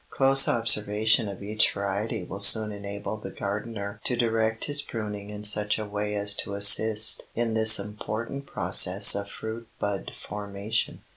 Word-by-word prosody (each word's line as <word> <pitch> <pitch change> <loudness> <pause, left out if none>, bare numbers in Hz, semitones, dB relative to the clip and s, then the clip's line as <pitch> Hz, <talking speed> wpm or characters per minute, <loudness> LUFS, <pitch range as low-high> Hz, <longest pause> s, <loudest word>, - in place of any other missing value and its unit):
Close 135 0 +5
observation 110 0 +2
of 100 0 -10
each 105 +2 +1
variety 100 +2 -4
will 95 +2 -9
soon 105 +1 +7
enable 100 +1 -7
the 100 -2 -9
gardener 100 +1 -7
to 125 - -2
direct 115 -2 -1
his 145 -1 0
pruning 105 -5 -7
in 105 0 -9
such 105 0 -1
a 110 - -6
way 105 0 -5
as 100 0 -1
to 100 - -5
assist 105 +2 +2
in 115 -1 -2
this 110 0 +6
important 110 +6 -7
process 95 +1 +4
of 100 0 -5
fruit 110 +2 -9
bud 100 -1 -5
formation. 100 +1 -5
105 Hz, 155 wpm, -25 LUFS, 100-110 Hz, -, soon